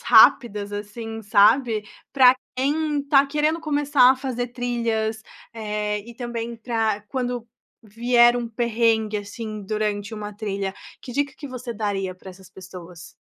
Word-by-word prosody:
rápidas 220 -3 +5
assim, 225 +2 -6
sabe, 215 +2 +3 0.3
para 255 -2 +7 0.2
quem 295 +3 0
está 280 0 +4
querendo 300 +3 0
começar 290 -4 +4
a - - -5
fazer 250 -2 -3
trilhas, 230 -3 -2 0.3
eh, 210 -2 -2
e 235 +3 -12
também 235 -1 -5
para 225 -3 -1
quando 245 -2 -3 0.4
vier 240 +2 +3
um 235 -1 -4
perrengue 225 -2 +1
assim 210 +1 -7
durante 210 0 -2
uma 210 -1 -6
trilha, 200 -2 -3 0.3
que 250 - -8
dica 280 +1 -1
que 290 - -8
você 250 -3 -6
daria 195 -3 -2
para 185 +1 -12
essas 185 0 -15
pessoas? 180 -2 -11
230 Hz, 140 wpm, -23 LUFS, 210-250 Hz, 0.4 s, para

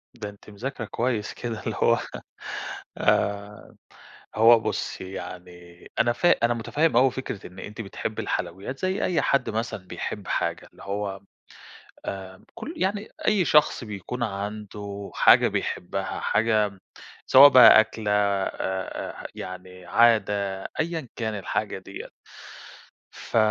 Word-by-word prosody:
ده 105 -3 -6
أنتِ 100 +1 -15
مذاكرة 115 +3 -5
كويّس 115 -1 -2
كده 115 -3 -5
اللي - - -3
هوّ - - +4 1.0
آآ 100 +1 -1 0.6
هوّ 115 +1 +7
بُصّي 95 -3 -4
يعني 90 0 -10
أنا 120 0 +3
فا 175 - +3
أنا 120 - +2
مُتَفَهِّم 145 +5 +1
أوي 130 0 +5
فكرة 125 -6 -6
إنّ 95 - -13
أنتِ 105 +2 -7
بتحبّي 100 - -4
الحلويّات 100 +10 -4
زَيّ 185 +1 -1
أيّ 175 - +1
حد 140 -2 +1
مثلًا 110 -4 -4
بيحب - - -5
حاجة، - - -2
اللي - - -15
هوّ 100 -1 -4 0.8
آآ، 95 -1 -7
كُلّ 320 - -7
يعني 200 +2 -1 0.2
أيّ 205 -5 +3
شخص 150 -4 +3
بيكون 105 +4 -5
عنده 100 -1 -5
حاجة - - +6
بيحبّها، 95 +2 -3
حاجة 110 -3 +1 0.5
سواء 140 +2 +9
بقى 125 -4 +9
أكلة 110 -1 0
آآ، 100 -1 +1 0.7
آآ، - - -6
يعني 90 0 -9
عادة، 100 -3 +2 0.2
أيًا 160 -4 -2
كان 110 -2 -3
الحاجة 105 +1 -2
دِيَّة. 95 +1 -9 1.0
ف - - -4
105 Hz, 130 wpm, -25 LUFS, 100-120 Hz, 1.0 s, سواء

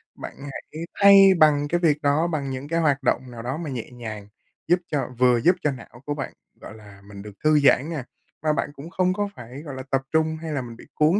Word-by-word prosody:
bạn - - -8 0.2
hãy 160 +4 -8 0.2
thay 200 0 +9 0.2
bằng 145 -2 +4
cái 175 +4 0
việc 155 -4 +2
đó, 145 +3 +2
bằng 150 -5 -3
những 130 +2 -5
cái 165 +2 0
hoạt 145 -4 +1
động 130 0 0
nào 115 -1 -8
đó 125 +5 -3
mà 165 -2 -5
nhẹ 125 -4 -5
nhàng, 110 -4 -8 0.4
giúp 175 +1 +4
cho 145 - -1
vừa 125 -1 +4
giúp 180 +8 +4
cho 150 - +1
não 120 -1 -11
của 145 - -2
bạn, 145 - -5 0.3
gọi - - -10
là, 100 -2 -15
mình 100 -1 -10
được 105 - -9
thư 155 -1 +5
giãn 140 +1 +4
nha, 155 -6 -4 0.4
mà 155 -1 +2
bạn - - -1
cũng 150 +3 -10
không 185 0 +1
có 205 +1 -2
phải, 125 +4 -10
gọi 145 -4 -8
là, 130 - -6
tập 135 -1 +2
trung, 160 0 +1
hay 160 -1 -5
là 140 -3 -1
mình 120 -2 -9
bị - - -14
cuốn 155 +6 +3
145 Hz, 250 wpm, -24 LUFS, 125-160 Hz, 0.4 s, thay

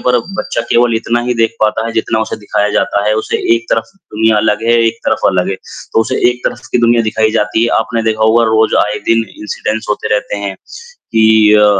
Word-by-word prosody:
पर 125 -1 +2 0.2
बच्चा 120 - -2
केवल 120 -1 +3
इतना 120 +1 -1
ही 125 - +1
देख 115 0 0
पाता 110 +1 +1
है, 115 - -4
जितना 110 0 -1
उसे - - -3
दिखाया 105 0 -1
जाता 100 0 0
है, 105 - +2
उसे 110 - -1 0.2
एक 115 0 -3
तरफ 115 - +1
दुनिया 110 - 0
अलग 105 +1 +1
है, 120 - +3
एक 115 0 -1
तरफ - - +1
अलग 90 0 0
है। 95 - -1 0.4
तो - - +3
उसे 110 - -1
एक 125 0 -7
तरफ 120 - -3
की - - +2
दुनिया 115 0 +3
दिखाई 110 0 0
जाती 110 0 0
है, 120 - +1
आपने 115 0 -2
देखा 110 -1 -1
होगा 115 +1 +4
रोज़ 110 0 +2
आए 105 0 -3
दिन 115 0 +2 0.2
इंसिडेंस 105 +1 -3
होते 105 - -2
रहते 105 0 -2
हैं, 100 -1 -4 0.4
कि 110 - +3
अ, 105 0 +5
110 Hz, 225 wpm, -13 LUFS, 105-115 Hz, 0.4 s, अ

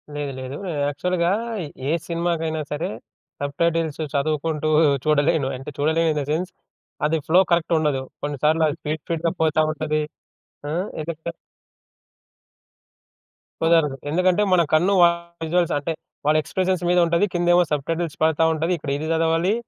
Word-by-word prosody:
లేదు. 145 -1 -3
లేదు. 130 +2 -6 0.3
యాక్చువల్‌గా 170 +4 0 0.6
ఏ - - +2 0.2
సినిమాకైనా 165 -2 -1
సరే 150 +2 -2 0.5
సబ్‌టైటిల్స్ 160 +2 0
చదువుకుంటూ 155 +1 0 0.4
చూడలేను. 150 -1 +2
అంటే 135 +3 -8
చూడలేను 160 +3 +2
ఇన్ 150 - -1
ద - - -2
సెన్స్. 175 +4 -1 0.5
అది 160 +2 +2
ఫ్లో 175 +3 +5
కరెక్ట్ 170 0 +2
ఉండదు. 145 -4 0 0.2
కొన్నిసార్లది 150 +2 +1
స్పీడ్ 155 +1 -3
స్పీడ్‌గా 165 0 -1
పోతా 155 -1 +3
ఉంటది. 155 -1 -1 0.7
ఆ! - - -3 0.3
ఇంకెక్కా 160 +1 -5 2.3
కుదరదు. 165 -4 +3
ఎందుకంటే 185 +4 +2
మన 175 - +5
కన్నువాళ్ళ 170 0 +4 0.2
విజువల్స్ 175 +1 +1
అంటే 160 +3 -2 0.3
వాళ్ళ 155 +1 +4
ఎక్స్ప్రెషన్స్ 185 +1 -1
మీద 180 0 +4
ఉంటది. 170 +4 +2
కిందేమో 175 0 +4
సబ్‌టైటిల్స్ 160 +2 -2
పడతా 160 0 +3
ఉంటది. 160 +2 -1
ఇక్కడ 145 -2 -5
ఇది 155 +2 -4
చదవాలి. 165 +4 +2
160 Hz, 130 wpm, -23 LUFS, 150-170 Hz, 2.3 s, ఫ్లో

